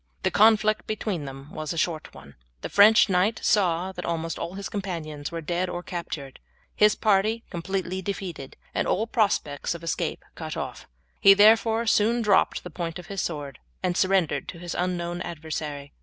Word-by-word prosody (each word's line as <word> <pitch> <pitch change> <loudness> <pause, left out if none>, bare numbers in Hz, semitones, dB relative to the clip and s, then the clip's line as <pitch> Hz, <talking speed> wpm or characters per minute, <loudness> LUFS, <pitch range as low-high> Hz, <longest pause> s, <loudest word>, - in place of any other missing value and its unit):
The - - +1
conflict 215 0 +4
between 210 -7 -3
them 135 +2 -9
was 155 +1 -4
a - - -7
short 160 -1 -2
one. 70 0 -13 0.3
The - - -5
French 215 +3 +7
knight 195 +3 +1
saw 185 -2 +2
that 180 -1 -7
almost 165 -1 -3
all 175 - -5
his 200 0 -5
companions 165 -8 -5
were 165 0 -4
dead 175 +3 -1
or 175 0 -5
captured, 155 -7 -6 0.4
his 210 0 +5
party 215 +2 +2
completely 185 +1 -3
defeated, 180 -8 -6 0.2
and - - 0
all 215 - +1
prospects 200 - 0
of 170 - -9
escape 165 - -3
cut - - -6
off. - - -6 0.3
He 195 0 +8
therefore 225 +2 +5
soon 230 +2 +2
dropped 200 -3 +3
the 180 - -8
point 165 0 -4
of 175 -1 -11
his 195 - -1
sword 145 -5 -5 0.2
and 180 -1 0
surrendered 185 -4 +1
to - - -7
his 175 0 -6
unknown 175 -1 -2
adversary. 150 -4 -5
180 Hz, 175 wpm, -26 LUFS, 165-200 Hz, 0.4 s, He